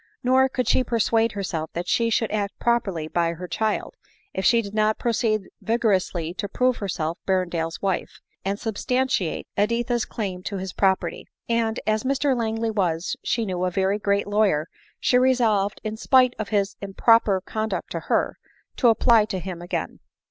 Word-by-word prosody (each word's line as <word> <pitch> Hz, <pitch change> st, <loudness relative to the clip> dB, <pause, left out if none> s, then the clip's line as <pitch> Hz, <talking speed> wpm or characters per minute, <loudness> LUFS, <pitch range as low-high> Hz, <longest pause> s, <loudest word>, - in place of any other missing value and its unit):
Nor 260 Hz, +1 st, +4 dB
could 250 Hz, -3 st, -2 dB
she 255 Hz, -, +3 dB
persuade 230 Hz, -1 st, +1 dB
herself 170 Hz, -6 st, -3 dB
that 175 Hz, +1 st, -4 dB
she 230 Hz, -1 st, +2 dB
should 225 Hz, 0 st, 0 dB
act 205 Hz, -2 st, -2 dB
properly 195 Hz, -10 st, 0 dB
by 170 Hz, +1 st, 0 dB
her 180 Hz, +2 st, -7 dB
child, 215 Hz, +5 st, -1 dB, 0.4 s
if 190 Hz, -, -3 dB
she 230 Hz, +4 st, +4 dB
did 200 Hz, 0 st, -8 dB
not 215 Hz, 0 st, +2 dB
proceed 220 Hz, -3 st, 0 dB, 0.2 s
vigorously 190 Hz, -6 st, 0 dB
to 205 Hz, -2 st, -2 dB
prove 255 Hz, -1 st, +1 dB
herself 170 Hz, -4 st, -3 dB
Ber 190 Hz, -1 st, +2 dB
rendale's 165 Hz, -1 st, -4 dB
wife, 190 Hz, -2 st, -2 dB, 0.2 s
and 200 Hz, +2 st, -2 dB
substantiate 250 Hz, -3 st, -1 dB
Editha's 235 Hz, +3 st, +1 dB
claim 190 Hz, -5 st, -4 dB
to 200 Hz, +2 st, -4 dB
his 185 Hz, -1 st, -5 dB
property; 190 Hz, -1 st, 0 dB, 0.2 s
and 230 Hz, -1 st, 0 dB
as 215 Hz, 0 st, +1 dB
Mr 275 Hz, +1 st, +1 dB
Langley 225 Hz, -1 st, -1 dB
was, 180 Hz, -5 st, -1 dB
she 230 Hz, -2 st, 0 dB
knew, 180 Hz, -2 st, -2 dB
a 185 Hz, -, +2 dB
very 195 Hz, +2 st, 0 dB
great 200 Hz, -1 st, +1 dB
lawyer, 205 Hz, -7 st, +2 dB, 0.3 s
she 250 Hz, -, +3 dB
resolved, 225 Hz, -6 st, +2 dB
in 215 Hz, 0 st, -4 dB
spke 255 Hz, +1 st, +4 dB
of 215 Hz, -, -3 dB
his 200 Hz, -2 st, 0 dB
improper 200 Hz, 0 st, +3 dB
con 215 Hz, +3 st, -3 dB
duct -, -, -4 dB
to -, -, -2 dB
her, -, -, -1 dB, 0.4 s
to 250 Hz, -, +4 dB
apply 225 Hz, -1 st, +5 dB
to 210 Hz, -3 st, -4 dB
him 180 Hz, -1 st, -6 dB
again. 175 Hz, -, -4 dB
210 Hz, 175 wpm, -24 LUFS, 190-230 Hz, 0.4 s, apply